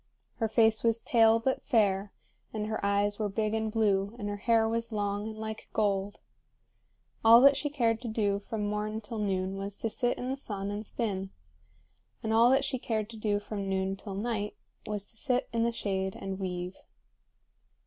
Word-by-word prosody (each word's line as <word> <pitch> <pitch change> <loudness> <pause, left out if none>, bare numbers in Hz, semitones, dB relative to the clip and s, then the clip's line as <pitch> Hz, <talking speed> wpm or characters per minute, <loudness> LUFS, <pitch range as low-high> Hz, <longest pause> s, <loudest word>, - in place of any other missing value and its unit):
Her 225 - +1
face 220 0 +3
was 230 -1 +3
pale 225 -1 +4
but 260 +3 0
fair, 205 -5 +2 0.4
and 215 -1 -3
her 215 -1 -3
eyes 205 +1 +1
were 210 -1 0
big 215 +1 -1
and 220 -1 -1
blue, 205 -1 +1
and 205 -3 -4
her 205 - -3
hair 225 +1 +3
was 230 +1 -2
long 205 0 -1
and 220 -1 -7
like 220 0 -6
gold. 200 -2 0 1.0
All 225 +1 +9
that 275 +1 +7
she 290 - -1
cared 230 -5 +1
to 245 - -5
do 205 -3 0
from 210 0 -4
morn 210 +1 -2
till 220 +1 -6
noon 190 -2 -1
was 200 +1 -4
to 225 - -2
sit 245 +1 0
in 250 +1 -3
the 270 - -2
sun 200 -6 -4
and 205 +1 -5
spin; 195 -5 -2 0.9
and 220 0 0
all 230 +2 +6
that 270 +1 +3
she 260 - -2
cared 220 -2 -2
to - - -10
do 210 -2 0
from 205 -1 -5
noon 190 0 0
till 195 0 -7
night 210 0 -2 0.3
was 210 -2 -3
to 225 - -13
sit 255 +1 0
in 230 - +1
the 235 - +1
shade 190 -4 -2
and 195 0 -5
weave. 180 -1 -4
215 Hz, 195 wpm, -30 LUFS, 200-230 Hz, 1.0 s, All